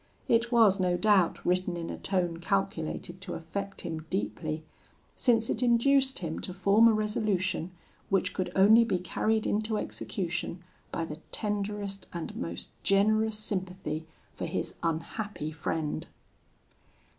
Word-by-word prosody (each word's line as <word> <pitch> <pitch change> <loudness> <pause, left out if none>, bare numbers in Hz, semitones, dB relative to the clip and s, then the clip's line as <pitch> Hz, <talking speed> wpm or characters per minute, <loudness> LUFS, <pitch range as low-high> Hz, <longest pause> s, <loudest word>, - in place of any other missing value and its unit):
It 235 +1 +3
was 220 -5 +5
no 180 -1 +2
doubt 200 -4 +3
written 180 0 +1
in 165 -1 -4
a - - -5
tone 175 -3 0
calculated 95 - -2
to - - -5
affect 195 +5 -5
him 160 -1 -5
deeply, 155 +10 -2 0.5
since 225 -3 +3
it 220 - 0
induced 265 +3 +4
him 165 -3 -3
to 185 - -6
form 200 +4 +5
a - - +6
resolution, 210 -5 0 0.4
which 185 -1 +1
could 180 -2 -2
only 215 +4 +7
be 225 -5 +1
carried 215 +5 0
into 215 +1 0
execution 175 -3 -3 0.3
by 165 - -2
the 150 -1 -7
tenderest 205 -1 -3
and 170 -2 -5
most 85 0 -4
generous 215 +3 +3
sympathy 185 -7 -3 0.3
for - - -4
his - - -2
unhappy 165 +1 -3
friend. 155 0 -2
190 Hz, 135 wpm, -29 LUFS, 165-215 Hz, 0.5 s, only